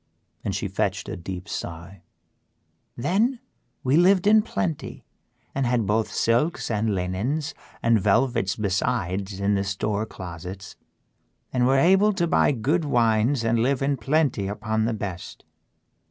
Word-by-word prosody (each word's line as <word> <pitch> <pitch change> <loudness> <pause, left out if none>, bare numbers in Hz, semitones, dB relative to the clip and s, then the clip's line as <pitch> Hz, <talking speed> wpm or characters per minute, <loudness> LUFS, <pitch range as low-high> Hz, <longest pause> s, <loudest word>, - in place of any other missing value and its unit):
And - - -2
she - - -2
fetched - - -2
a - - -4
deep 90 +2 -7
sigh. 85 0 -7 1.0
"Then 210 - +1 0.4
we 135 +4 +3
lived 185 +2 +4
in 215 +1 +6
plenty 95 - -4 0.5
and 135 -2 0
had 120 -3 +1
both 110 +2 0
silks 120 +6 +1
and 105 -1 0
linens 115 +12 -2 0.3
and 115 -2 +3
velvets 110 -1 +2
besides 100 -1 -1
in 100 +1 +1
the 100 -1 +1
store 100 +2 -2
closets 90 +1 -8 0.8
and 125 -1 +2
were 135 +1 +4
able 195 +8 +4
to 180 -3 0
buy 165 - +3
good 145 +7 0
wines 120 -1 +2
and 115 0 +2
live 135 +3 +1
in 140 +1 +1
plenty 135 -4 0
upon 110 +2 -1
the 115 - 0
best. 95 -4 -7
115 Hz, 140 wpm, -24 LUFS, 100-140 Hz, 1.0 s, in